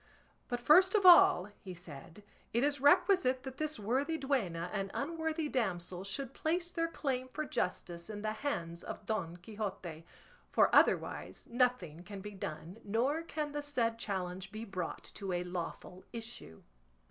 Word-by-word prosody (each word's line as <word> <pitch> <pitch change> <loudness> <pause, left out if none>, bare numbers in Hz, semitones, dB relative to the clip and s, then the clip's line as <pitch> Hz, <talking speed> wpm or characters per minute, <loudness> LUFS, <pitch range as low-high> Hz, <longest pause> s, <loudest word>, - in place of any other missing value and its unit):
"But 245 - -2
first 365 - +6
of 400 -3 +3
all," 210 - +8
he 185 -3 -8
said, 170 +3 -10 0.3
"it 235 +3 +2
is 285 -1 +1
requisite 285 -3 +4
that 265 -1 -7
this 310 -2 -2
worthy 265 +10 0
duenna 200 - -1
and 195 -1 -1
unworthy 320 +1 -1
damsel 185 -8 -2
should 235 +6 -4
place 345 +2 -1
their 330 -1 0
claim 265 -6 -2
for 305 +4 -4
justice 175 -5 -3
in 205 -1 -6
the 215 - 0
hands 170 -10 -3
of - - -7
Don 180 -6 -2
Quixote; 185 -4 -6 0.5
for - - +4
otherwise - - +2
nothing 235 - +1
can 200 +2 -8
be 205 +2 -7
done, 180 0 -6
nor 250 +10 +1
can 305 -2 -3
the 295 0 -3
said 235 -6 0
challenge 190 -2 -3
be 220 +1 -6
brought 185 -5 -4
to 195 -3 -4
a 175 0 0
lawful 180 +1 -6
issue." 225 - -8
225 Hz, 160 wpm, -34 LUFS, 180-285 Hz, 0.5 s, all